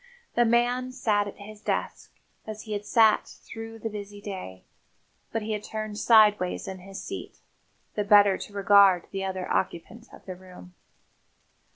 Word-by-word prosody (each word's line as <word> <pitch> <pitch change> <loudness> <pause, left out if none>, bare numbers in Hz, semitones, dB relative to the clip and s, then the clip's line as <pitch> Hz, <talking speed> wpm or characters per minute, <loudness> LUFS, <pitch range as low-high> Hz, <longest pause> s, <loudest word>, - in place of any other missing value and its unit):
The 240 - +3
man 245 +2 +1
sat 210 -5 0
at 205 - -9
his 210 +1 -11
desk, - - -3 0.4
as 215 0 -7
he 215 - -6
had 205 0 -4
sat 220 -2 +4
through 225 0 -10
the 225 - -5
busy 205 -1 -8
day, 185 - -8 0.7
but 225 -1 -2
he 220 - -4
had 210 -1 -3
turned 215 -1 -5
sideways 210 -5 +4
in 190 -1 -6
his 195 +1 -9
seat, 385 - -7 0.6
the 210 - -1
better 205 -1 +6
to - - -8
regard 200 -2 +5
the 195 -1 -3
other 190 -1 -3
occupant 225 +7 -3
of - - -15
the 185 - -6
room. 180 0 -14
205 Hz, 165 wpm, -27 LUFS, 195-220 Hz, 0.7 s, better